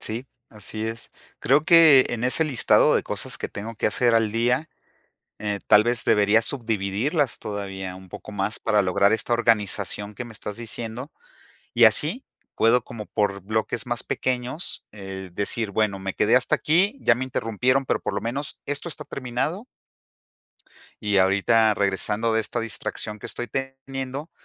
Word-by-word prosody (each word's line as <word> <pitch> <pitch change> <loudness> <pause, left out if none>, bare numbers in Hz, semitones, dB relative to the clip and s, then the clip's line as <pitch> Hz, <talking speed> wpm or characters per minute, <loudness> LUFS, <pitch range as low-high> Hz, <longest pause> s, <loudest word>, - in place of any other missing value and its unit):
Sí, 115 +4 -3 0.2
así 110 +1 -5
es. 115 0 -7 0.3
Creo 145 +3 +3
que 160 -6 +7
en 120 0 -3
ese 130 +6 +3
listado 140 -7 +4
de - - +2
cosas - - -2
que - - -4
tengo 110 +3 -7
que - - -1
hacer 120 +2 +2
al 110 -2 +2
día, 125 +6 +1 0.7
eh, 105 -1 -3
tal 105 +1 +6
vez 120 0 0
deberías 105 +1 +3
subdividirlas 115 - -1
todavía 95 -3 -6
un 95 0 -14
poco 105 - -10
más 100 +1 -2
para 105 -2 +2
lograr 100 +3 +2
esta 110 +2 0
organización 105 -3 +1
que 125 - -6
me 120 - -11
estás 105 -1 -7
diciendo, 120 +4 -4 0.6
y - - +6
así, 260 - +4 0.3
puedo 115 +2 +3
como 110 -2 -9
por 100 -2 -1
bloques 110 +5 -2
más 120 0 -3
pequeños, 130 +5 -3
eh, 95 -2 -8
decir: 105 +2 -1
"Bueno, 100 -2 0
me 95 0 -4
quedé 110 +4 +3
hasta 125 - +3
aquí, 190 - +2
ya 115 - +4
me 130 - -3
interrumpieron, 130 +2 0
pero - - 0
por - - -4
lo 100 - -2
menos 135 +6 -4
esto 145 +4 -2
está 155 - -5
terminado" 135 - -4 1.3
"y 105 -2 +1
ahorita, 105 +3 +3
regresando 105 +3 0
de 110 - +2
esta 110 +2 -3
distracción 105 -1 -4
que - - -8
estoy 120 - -5
teniendo, 135 +2 -5
115 Hz, 165 wpm, -24 LUFS, 105-130 Hz, 1.3 s, que